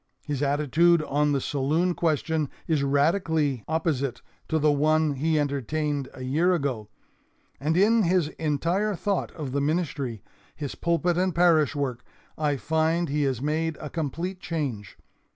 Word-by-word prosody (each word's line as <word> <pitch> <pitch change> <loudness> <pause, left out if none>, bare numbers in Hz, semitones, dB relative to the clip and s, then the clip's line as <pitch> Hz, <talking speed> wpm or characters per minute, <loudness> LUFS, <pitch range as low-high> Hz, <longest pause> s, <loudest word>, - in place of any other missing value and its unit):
His 145 -2 -3
attitude 150 +4 +3
on 150 0 +1
the 140 - +1
saloon 150 +7 0
question 160 -2 0 0.2
is 155 -4 +1
radically 145 - +1
opposite 155 -5 -1 0.3
to 160 - +2
the 150 -1 +3
one 155 +1 +2
he 155 +3 +1
entertained 145 0 -1
a 130 - -8
year 165 +8 +2
ago. 130 -9 -3 0.7
And 155 +4 0
in 220 +4 +5
his 180 -4 +2
entire 170 +7 0
thought 200 +2 -1
of 150 -6 -5
the 140 +1 0
ministry, 140 - -2 0.3
his 145 -3 -5
pulpit 170 +1 0
and 185 -1 0
parish 165 -4 +4
work, 130 -4 -2 0.3
I 150 -2 0
find 160 +3 0
he 150 +1 0
has 130 -2 -1
made 160 +1 -1
a 150 - -7
complete 170 +4 -3
change. 140 - -4
155 Hz, 150 wpm, -26 LUFS, 140-165 Hz, 0.7 s, in